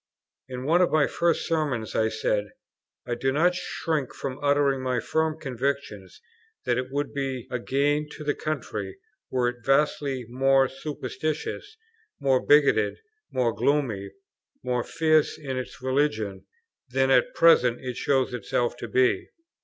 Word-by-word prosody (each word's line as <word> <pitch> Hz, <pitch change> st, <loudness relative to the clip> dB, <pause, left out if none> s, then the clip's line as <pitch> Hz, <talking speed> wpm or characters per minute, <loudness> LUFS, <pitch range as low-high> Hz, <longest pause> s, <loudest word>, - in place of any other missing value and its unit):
In 125 Hz, 0 st, -6 dB
one 170 Hz, +5 st, +4 dB
of 180 Hz, -, +4 dB
my 155 Hz, -2 st, +3 dB
first 170 Hz, -2 st, 0 dB
Sermons 145 Hz, -9 st, -1 dB
I 110 Hz, 0 st, +2 dB
said, 105 Hz, -1 st, -1 dB, 0.6 s
"I 120 Hz, -, -2 dB
do 135 Hz, +3 st, 0 dB
not 170 Hz, +6 st, +3 dB
shrink 160 Hz, -5 st, -3 dB
from 135 Hz, -1 st, -5 dB
uttering 140 Hz, -2 st, +2 dB
my 130 Hz, -2 st, 0 dB
firm 160 Hz, +5 st, -1 dB
conviction 130 Hz, -8 st, -3 dB, 0.6 s
that 120 Hz, 0 st, +1 dB
it 125 Hz, -, -3 dB
would 140 Hz, +1 st, -3 dB
be 135 Hz, -3 st, -3 dB
a 125 Hz, -, -1 dB
gain 145 Hz, +4 st, 0 dB
to 150 Hz, -, -8 dB
the 145 Hz, -1 st, +1 dB
country 110 Hz, -12 st, -4 dB, 0.3 s
were 125 Hz, -1 st, +1 dB
it 120 Hz, -1 st, -4 dB
vastly 135 Hz, -1 st, +1 dB
more 135 Hz, +2 st, +3 dB
superstitious, 155 Hz, -, -5 dB, 0.4 s
more 135 Hz, -3 st, +2 dB
bigoted, 140 Hz, -8 st, +4 dB, 0.3 s
more 120 Hz, -3 st, 0 dB
gloomy, 120 Hz, -9 st, 0 dB, 0.5 s
more 125 Hz, -1 st, 0 dB
fierce 155 Hz, -2 st, +2 dB
in 135 Hz, -4 st, -5 dB
its 130 Hz, -, -8 dB
religion 130 Hz, -7 st, -1 dB, 0.4 s
than 130 Hz, +1 st, +2 dB
at -, -, +3 dB
present 125 Hz, -8 st, +5 dB
it 125 Hz, -1 st, -5 dB
shows 135 Hz, -1 st, +1 dB
itself 120 Hz, +1 st, -1 dB
to 120 Hz, -, -6 dB
be." 125 Hz, +2 st, +2 dB
135 Hz, 145 wpm, -26 LUFS, 125-150 Hz, 0.6 s, present